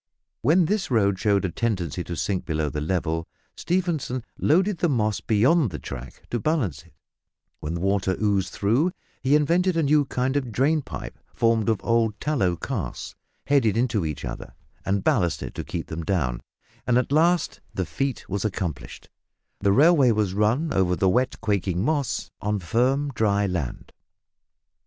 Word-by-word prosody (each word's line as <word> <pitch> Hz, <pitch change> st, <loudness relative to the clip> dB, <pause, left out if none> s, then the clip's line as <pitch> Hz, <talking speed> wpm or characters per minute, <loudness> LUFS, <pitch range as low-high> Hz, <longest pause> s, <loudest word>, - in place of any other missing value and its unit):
When 160 Hz, -, +4 dB
this 205 Hz, +3 st, -1 dB
road 100 Hz, -6 st, +2 dB
showed 100 Hz, -1 st, +2 dB
a 90 Hz, -, -2 dB
tendency 90 Hz, -, -2 dB
to 85 Hz, -, -5 dB
sink 95 Hz, +3 st, -1 dB
below 80 Hz, -2 st, -1 dB
the 75 Hz, +1 st, -4 dB
level, 80 Hz, 0 st, -1 dB, 0.3 s
Stephenson 165 Hz, -9 st, -1 dB
loaded 185 Hz, +4 st, +2 dB
the 175 Hz, -, +2 dB
moss 110 Hz, -6 st, +1 dB
beyond 125 Hz, +6 st, +3 dB
the 80 Hz, -, -6 dB
track -, -, -9 dB
to 120 Hz, -, 0 dB
balance 110 Hz, -, -1 dB
it; 85 Hz, +1 st, -23 dB, 0.7 s
when 80 Hz, +3 st, -4 dB
water 95 Hz, 0 st, 0 dB
oozed 100 Hz, -4 st, +1 dB
through, 130 Hz, -, +1 dB, 0.3 s
he 135 Hz, +3 st, +3 dB
invented 170 Hz, +4 st, +2 dB
a 165 Hz, -, +2 dB
new 145 Hz, 0 st, +3 dB
kind 130 Hz, +1 st, -1 dB
of 130 Hz, -4 st, -1 dB
drain 150 Hz, +7 st, +2 dB
pipe -, -, -8 dB, 0.2 s
formed 115 Hz, -1 st, +2 dB
of 110 Hz, -3 st, +1 dB
old 115 Hz, -3 st, +1 dB
tallow 100 Hz, -, +1 dB
casks, -, -, -5 dB, 0.3 s
headed 130 Hz, -7 st, +3 dB
into 115 Hz, -5 st, +1 dB
each 75 Hz, -4 st, -4 dB
other, -, -, -7 dB, 0.3 s
and 100 Hz, 0 st, 0 dB
ballasted 90 Hz, -6 st, 0 dB
to -, -, -5 dB
keep -, -, -5 dB
them 80 Hz, +1 st, -5 dB
down, 70 Hz, -10 st, -1 dB, 0.5 s
and 120 Hz, -1 st, +4 dB
at 125 Hz, -, 0 dB
last 170 Hz, +4 st, +2 dB
the 95 Hz, -, -2 dB
feat 135 Hz, -, -3 dB
was 100 Hz, +1 st, -2 dB
accomplished 90 Hz, -7 st, -4 dB, 0.5 s
the 100 Hz, -1 st, +2 dB
railway 145 Hz, -, +5 dB
was 105 Hz, -4 st, +1 dB
run 115 Hz, +10 st, +1 dB
over 90 Hz, -2 st, +2 dB
the 95 Hz, -, +1 dB
wet 125 Hz, +7 st, +1 dB
quaking 100 Hz, -3 st, 0 dB
moss 145 Hz, -4 st, -1 dB
on 105 Hz, 0 st, 0 dB
firm 130 Hz, -, +1 dB
dry 105 Hz, -3 st, +2 dB
land. 90 Hz, -10 st, -4 dB
110 Hz, 165 wpm, -24 LUFS, 95-140 Hz, 0.7 s, railway